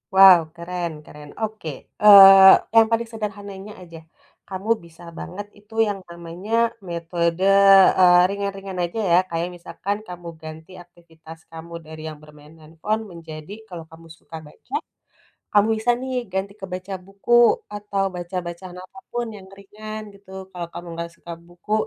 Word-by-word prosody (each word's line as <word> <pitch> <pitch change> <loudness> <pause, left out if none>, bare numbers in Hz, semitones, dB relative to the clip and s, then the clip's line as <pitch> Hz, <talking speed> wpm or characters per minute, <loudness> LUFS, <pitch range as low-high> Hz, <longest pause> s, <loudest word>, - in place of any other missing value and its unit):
Wow, 190 -2 +9 0.2
keren 170 0 -4
keren. 150 0 -13
Oke. 215 -6 -4 0.3
Eee, 195 -2 +10 0.2
yang 225 -1 +7
paling 230 +1 +1
sederhananya, 205 -2 -7
aja. 165 -2 -12 0.5
Kamu 195 +3 -6 0.2
bisa 170 0 -17
banget 200 +3 -7
itu 210 +2 -20
yang 200 -1 -3
namanya, 170 +5 -9 0.4
metode, 170 +1 -2 0.6
eee, 180 -1 +7
ringan-ringan 195 -1 -5
aja, 175 +6 -4
ya, 170 - +6
kayak 170 +1 -3
misalkan 195 +3 -5
kamu 175 -1 -9
ganti 160 +2 -11
aktivitas 165 -2 -16
kamu 165 +1 -10
dari 155 0 -10
yang 155 - -10
bermain 150 0 -17
handphone 160 +8 -4
menjadi, 160 +1 -10 0.2
kalau 170 -3 -9
kamu 165 0 -15
suka 165 - -11
baca, 275 - -10 0.8
kamu 205 +1 +5
bisa, 230 +3 0
nih, 260 0 -5 0.2
ganti 190 +1 -3
ke 195 - -6
baca 185 +1 -6
buku, 195 +4 -6 0.4
atau 205 -1 -3
baca 175 +1 -7
bacaan 175 +1 -8
apa 185 +7 -15 0.2
pun 240 0 -2
yang 190 -2 -13
ringan, 215 +2 -9
gitu. 200 -1 -19 0.2
Kalau 175 -2 -6
kamu 175 - -8
nggak 170 0 -5
suka 170 - -10
buku, 175 +4 -10
180 Hz, 150 wpm, -22 LUFS, 170-200 Hz, 0.8 s, Eee